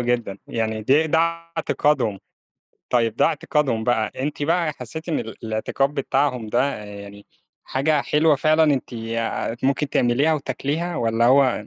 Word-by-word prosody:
جدًا. 120 -5 -1
يعني 110 -1 -2
دي 145 +7 +3
ده 160 +1 +2
اعتقادهم. 165 -9 0 0.7
طيب، 115 -2 +1
ده - - +3
اعتقادهم 145 -7 0
بقى، 110 -3 +1
أنتِ 145 +2 -3
بقى 165 0 +1
حسيتِ 160 +6 -8
إن 160 - 0
الاعتقاد 115 +5 -2
بتاعهم 130 -4 0
ده، 120 +3 +1
آآ، 105 - -7
يعني 100 0 -10 0.4
حاجة 145 +3 +1
حلوة 150 0 +3
فعلًا 155 +3 +3
أنتِ 140 -4 0
آآ، 115 0 -3
ممكن 140 +2 +1
تعمليها 135 +6 +2
وتاكليها؟ 145 +5 -3
والََّا 115 0 0
هو 130 -5 +3
130 Hz, 145 wpm, -22 LUFS, 115-150 Hz, 0.7 s, دي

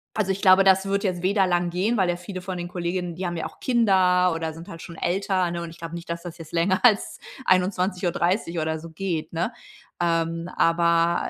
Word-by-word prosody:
Also, 195 -3 +1
ich 190 - -3
glaube, 190 0 +6
das 190 0 +4
wird 200 +1 0
jetzt 180 -3 -1
weder 195 +1 +2
lang 175 -1 +1
gehen, 190 +7 0
weil 185 -3 +2
ja 175 - +1
viele 185 +1 -7
von 185 0 -5
den 175 0 -4
Kolleginnen, 175 -1 -3
die 185 - -4
haben 175 -1 -4
ja - - -3
auch - - -9
Kinder 185 -7 +3
oder 165 -1 -3
sind 165 +2 -11
halt 165 - -9
schon 170 - -9
älter, 185 0 0
ne? 170 0 -4
Und 170 - -6
ich 165 - -13
glaube 165 0 -8
nicht, 170 0 -8
dass 170 0 -4
das 175 -1 -8
jetzt 160 -1 -11
länger 185 +3 +1
als 220 -5 +3 0.3
21:30 180 -1 +1
oder 160 0 -1
so 165 +1 -10
geht, 165 -1 -3
ne? 170 +9 -1 0.5
Ähm, 165 0 0
aber 170 0 +2
175 Hz, 225 wpm, -24 LUFS, 170-190 Hz, 0.5 s, glaube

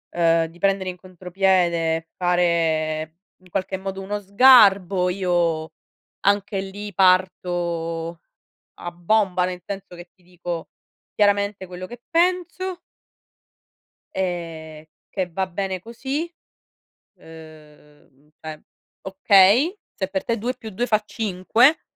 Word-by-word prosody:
uhm, 165 -1 +3
di 165 +2 -13
prendere 195 0 +1
in 180 - -7
contropiede, 175 -3 0
fare 165 -3 0 0.3
in 185 - -20
qualche 190 +1 -2
modo 195 0 -5
uno 205 +2 -3
sgarbo, 200 -4 +5
io 175 -4 0 0.5
anche 200 0 +1
lì 200 +2 -7
parto 175 -3 +1 0.6
a 175 - -7
bomba. 180 +1 +1
Nel 180 -1 -6
senso 195 -2 -7
che 175 0 -12
ti 185 - -31
dico 175 -1 -6 0.5
chiaramente 205 -1 +1
quello 180 0 -8
che 240 +3 -11
penso 360 +1 0 1.3
e 165 -4 -4 0.2
che 185 -2 -2
va 190 +3 -1
bene 185 +1 -3
così. 265 - -4 0.9
Uhm, 150 -3 -16
cioè, 155 -1 -8 0.4
okay, 200 - +4 0.2
se 190 - -3
per 190 0 -3
te 230 - -1
2+2 235 -1 -3
fa 215 -3 +2
5 220 - +2
185 Hz, 110 wpm, -22 LUFS, 170-200 Hz, 1.3 s, sgarbo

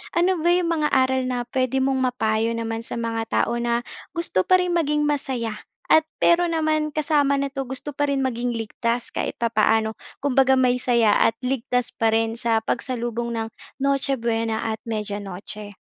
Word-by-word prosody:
Ano 350 0 +2
ba 340 - +2
'yong 355 0 +3
mga 305 -2 +1
aral 260 0 +2
na 245 -1 -2
puwede 255 +1 -1
mong 265 0 +1
mapayo 220 -2 0
naman 225 0 -3
sa 230 - -5
mga 230 -1 -2 0.2
tao 235 - -2
na 235 0 0 0.3
gusto 335 - +1
pa 370 - +4
rin 360 -1 0
maging 300 -3 +1
masaya, 265 -6 -1 0.3
at 315 - +6 0.2
pero 345 0 +4
naman 310 -2 +1
kasama 290 -2 +2
nito 275 0 -2
gusto 275 +2 -5
pa 290 +1 0
rin 270 -1 +1
maging 240 -1 -1
ligtas 230 +2 -2
kahit - - -3
papaano, 220 -1 +2 0.2
kumbaga 265 -1 +3
may 250 -1 +2
saya 235 -4 +3 0.2
at 225 - -10
ligtas 250 -1 -1
pa 225 - +1
rin 225 0 +1
sa 225 -1 0
pagsalubong 240 -1 -2
ng 225 -1 -2 0.3
Noche 275 0 +1
Buena 225 -1 -1
at 220 - -8
Media 210 -2 -3
Noche? 205 +1 -8
245 Hz, 175 wpm, -23 LUFS, 225-280 Hz, 0.3 s, at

